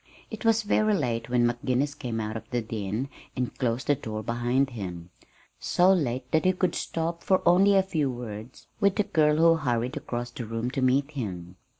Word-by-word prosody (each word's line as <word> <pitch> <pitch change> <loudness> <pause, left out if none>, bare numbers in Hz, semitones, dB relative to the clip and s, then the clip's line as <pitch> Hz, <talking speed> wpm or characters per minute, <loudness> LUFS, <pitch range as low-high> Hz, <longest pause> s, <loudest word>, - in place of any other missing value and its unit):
It 220 - -7
was 225 -1 +3
very 215 0 +2
late 120 -8 -2
when 120 -1 +3
McGinnis 125 +4 0
came 120 -5 -4
out 110 0 -3
of 110 - -7
the 125 - 0
den 110 +2 -3 0.3
and 125 -1 -2
closed 120 -1 -1
the 145 - +3
door 110 -5 -5
behind 120 +4 0
him 90 -6 -7 0.5
so 180 +2 +4
late 130 -7 -1
that 160 - +3
he 185 0 +3
could 180 -1 0
stop 165 +1 -3
for 190 -1 +2
only 195 +3 +6
a 195 - +5
few 160 -7 -1
words 120 -1 -8
with 200 -2 +3
the 210 - +2
girl 150 -4 +3
who 165 +1 +5
hurried 125 -2 -1
across 120 -4 -4
the 120 -2 -6
room 115 +2 -3
to 135 - -2
meet 135 +3 +2
him. 90 - -5
125 Hz, 200 wpm, -27 LUFS, 115-165 Hz, 0.5 s, only